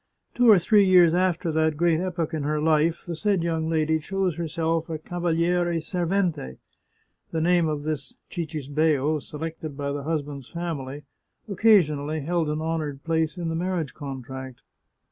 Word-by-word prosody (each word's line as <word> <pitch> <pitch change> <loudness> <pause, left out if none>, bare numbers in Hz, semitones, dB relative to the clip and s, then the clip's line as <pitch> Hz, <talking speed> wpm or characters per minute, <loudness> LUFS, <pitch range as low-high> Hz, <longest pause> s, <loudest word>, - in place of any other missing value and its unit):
Two 245 -1 +4
or 210 - +9
three 205 +4 +4
years 180 -3 +6
after 175 -2 +1
that 160 -1 +1
great 170 -1 +3
epoch 175 -3 -2
in 155 - -1
her 150 +1 0
life 160 +2 +2
the 175 -2 -4
said 195 0 +1
young 160 -1 -1
lady 160 -1 +1
chose 190 +1 -1
herself 165 0 -1
a 160 - -2
cava 175 +3 -4
liere 170 +1 +1
servente; 175 - -1 0.7
the 165 - -2
name 170 0 +3
of 150 -2 -2
this 150 -2 -4 0.2
cictsbeo, 155 -2 0
selected 155 -1 -6
by 140 -1 -2
the 145 0 -3
husband's 145 -3 -4
family, 150 -5 -5 0.4
occasionally 160 -8 +3
held 165 +1 0
an 150 +1 -2
honoured 155 -4 -3
place 160 +1 0
in 170 -2 -3
the 165 - -2
marriage 175 -4 -2
contract. 130 -2 -8
160 Hz, 160 wpm, -25 LUFS, 150-175 Hz, 0.7 s, or